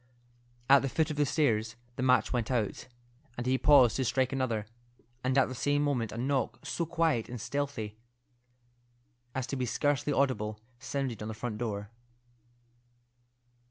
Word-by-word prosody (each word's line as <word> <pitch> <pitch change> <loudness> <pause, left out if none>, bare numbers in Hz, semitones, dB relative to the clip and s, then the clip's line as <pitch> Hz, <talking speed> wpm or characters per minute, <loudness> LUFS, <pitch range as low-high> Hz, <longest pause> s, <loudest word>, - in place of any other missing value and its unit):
At 140 0 +7
the 135 - -1
foot 160 +3 +1
of 150 - -5
the 145 -1 +2
stairs 110 -7 +1 0.2
the 130 - -4
match 130 0 +3
went 120 -3 -1
out, 115 -4 -1 0.5
and 120 - -3
he 130 +1 +2
paused 135 -5 +6
to 135 - +1
strike 130 +1 +1
another; 120 -6 -1 0.6
and 130 +1 +1
at 135 - +6
the 130 - -6
same 145 +3 +1
moment 125 -7 0
a 110 - -7
knock, 135 +2 0
so 170 - -2
quiet 165 -8 +1
and 125 0 -6
stealthy 115 -5 -3 1.4
as 130 -2 -1
to 140 - -4
be 130 -2 -1
scarcely 145 +3 0
audible, 110 -7 0 0.2
sounded 130 -3 -3
on 105 - -4
the 110 - -5
front 110 -1 -4
door. 105 -3 -3
130 Hz, 160 wpm, -30 LUFS, 115-140 Hz, 1.4 s, At